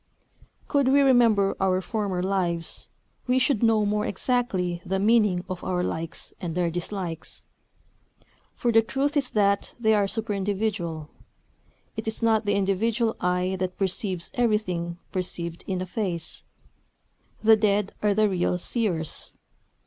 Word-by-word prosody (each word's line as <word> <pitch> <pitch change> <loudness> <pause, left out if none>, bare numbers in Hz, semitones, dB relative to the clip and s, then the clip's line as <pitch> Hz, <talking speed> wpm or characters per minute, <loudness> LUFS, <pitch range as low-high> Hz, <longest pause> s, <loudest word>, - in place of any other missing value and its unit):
Could 280 -3 +2
we 280 +2 +5
remember 235 -7 +4
our 185 -1 +3
former 195 -3 -2
lives, 175 -3 -2 0.4
we 250 +1 +3
should 260 -3 +2
know 225 -2 +4
more 210 +1 0
exactly 190 -8 -1
the 190 - -1
meaning 205 -3 +3
of 185 -1 -5
our 180 -1 -1
likes 165 -2 -5
and 170 -1 -4
our 175 -2 +1
dislikes. 175 -1 -4 1.1
For 240 - 0
the 225 0 +6
truth 275 +6 -1
is 280 -3 +1
that 200 -1 +1
they 220 -2 +3
are 205 -2 +3
superindividual. 200 -6 -2 0.9
It 220 0 -5
is 220 +1 -3
not 220 -2 +3
the 205 - +3
individual 220 +4 +1
eye 180 +1 0
that 185 0 -3
perceives 190 -2 -1
everything 185 -8 0
perceived 170 -2 -3
in 185 -1 -1
a - - -5
face. 180 -4 -3 1.0
The 220 0 +7
dead 205 -2 +1
are 210 -1 +2
the 215 0 +4
real 180 -2 0
seers. 180 -5 -2
200 Hz, 140 wpm, -26 LUFS, 180-220 Hz, 1.1 s, The